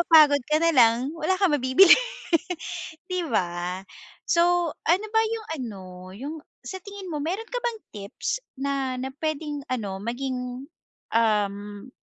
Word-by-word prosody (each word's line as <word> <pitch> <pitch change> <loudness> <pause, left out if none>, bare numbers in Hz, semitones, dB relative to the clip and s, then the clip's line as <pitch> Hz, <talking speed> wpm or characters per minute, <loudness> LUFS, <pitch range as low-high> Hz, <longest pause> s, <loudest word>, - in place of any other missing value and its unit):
mapagod 305 -4 +7
ka 305 - +3
na 335 0 +4
lang 240 +4 +5
wala 330 +4 +1
kang 380 -5 +4
mabibili 270 +8 +7 1.2
'di 350 -3 -1
ba? 180 -3 -1 0.5
So, 345 -1 +3
ano 375 +6 +3
ba 445 - +5
yung 445 0 -4
ano 210 -6 -6 0.3
yung 280 +8 -5 0.3
sa 380 -1 -6
tingin 400 -1 -8
mo, 295 - -2
mayro'n 370 +9 -2
ka - - -2
bang 470 -2 -2
tips 205 - -4 0.2
na, 270 -2 -1
na 265 +1 -3
puwedeng 305 -2 -2
ano 200 -6 -3
maging, 250 +2 -4 0.5
um 205 0 0
280 Hz, 140 wpm, -25 LUFS, 230-345 Hz, 1.2 s, mapagod